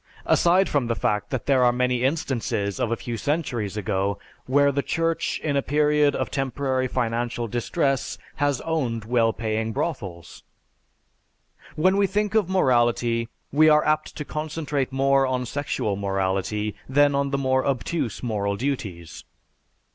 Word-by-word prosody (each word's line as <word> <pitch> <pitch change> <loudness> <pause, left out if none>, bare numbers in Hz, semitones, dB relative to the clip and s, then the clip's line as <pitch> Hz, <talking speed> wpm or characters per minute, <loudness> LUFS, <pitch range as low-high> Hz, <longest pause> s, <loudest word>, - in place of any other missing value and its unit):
(Aside 180 +3 +4
from 140 -5 0
the 115 - 0
fact 105 -4 -1
that 130 - -3
there 135 -3 +3
are 120 - +5
many 125 0 0
instances 125 - -1
of 115 - 0
a - - +2
few 120 0 -5
centuries 120 - -2
ago 100 -1 -1 0.3
where 140 +2 +4
the 140 +1 0
Church 165 +2 -1
in 145 -2 0
a 140 - +3
period 150 +1 +2
of - - -2
temporary 135 -1 -1
financial 120 -1 -2
distress 135 - -1 0.2
has 145 -2 +1
owned 125 -9 -2
well 115 -1 +2
paying 110 0 -2
brothels.) 100 - -4 1.3
When 185 +5 +3
we 200 -1 +3
think 210 +1 -1
of 215 -5 +2
morality 120 -8 +2 0.2
we 155 +3 +5
are 150 0 +4
apt 155 0 0
to 150 - -5
concentrate 150 -3 -3
more 135 0 +3
on 130 -1 -1
sexual 125 -6 -2
morality 100 +2 -1 0.2
than 145 +1 +4
on 140 0 0
the 140 - 0
more 130 -1 +1
obtuse 135 -1 -2
moral 100 -4 -1
duties. 100 - -4
130 Hz, 150 wpm, -24 LUFS, 115-145 Hz, 1.3 s, are